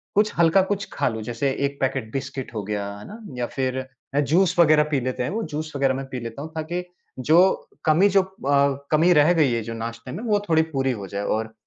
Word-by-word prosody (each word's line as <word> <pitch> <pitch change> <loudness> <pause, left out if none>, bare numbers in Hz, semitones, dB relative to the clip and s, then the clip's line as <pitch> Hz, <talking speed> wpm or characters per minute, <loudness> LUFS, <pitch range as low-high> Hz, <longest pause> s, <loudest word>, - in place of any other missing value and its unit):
कुछ 210 +1 +3
हल्का, 170 +3 +5
कुछ 195 +1 -2
खा - - 0
लूँ, 110 -1 -5
जैसे 120 +4 -1 0.2
1 140 - -10
पैकेट 130 -4 -1
बिस्किट 135 -2 -5
हो 105 - -3
गया, 100 0 -3
है 100 - -11
ना? 215 +3 -10 0.2
या 120 - -1
फिर 130 0 -2 0.3
अ, 140 - +2
जूस 165 +6 +2
वग़ैरह 155 -2 +6
बात 150 0 -7
रह 140 - +3
पी 125 - -6
लेते 130 -1 -2
हैं। - - -2
वो 225 +2 -2
जूस 155 +1 -4
वग़ैरह 135 -1 +2
मैं 135 - -4
पी 130 - -4
लेता 115 +3 -7
हूँ 160 +2 -7
ताकि 165 +3 -3 0.4
जो 155 +6 +4 0.5
कमी 170 +6 +5
जो 195 0 +4
अ, 140 -6 0
कमी 165 +4 +5
रह 155 +2 +5
गई 150 -7 +3
है 115 - 0
जो 115 +1 -6
नाश्ते 115 +2 -6
में, 215 - -6
वो 210 -3 +2
थोड़ी 160 -1 +5
पूरी 135 -1 +1
हो 95 - -6
जाए। 100 +1 -4
और 110 +1 -2
140 Hz, 245 wpm, -23 LUFS, 125-165 Hz, 0.5 s, वग़ैरह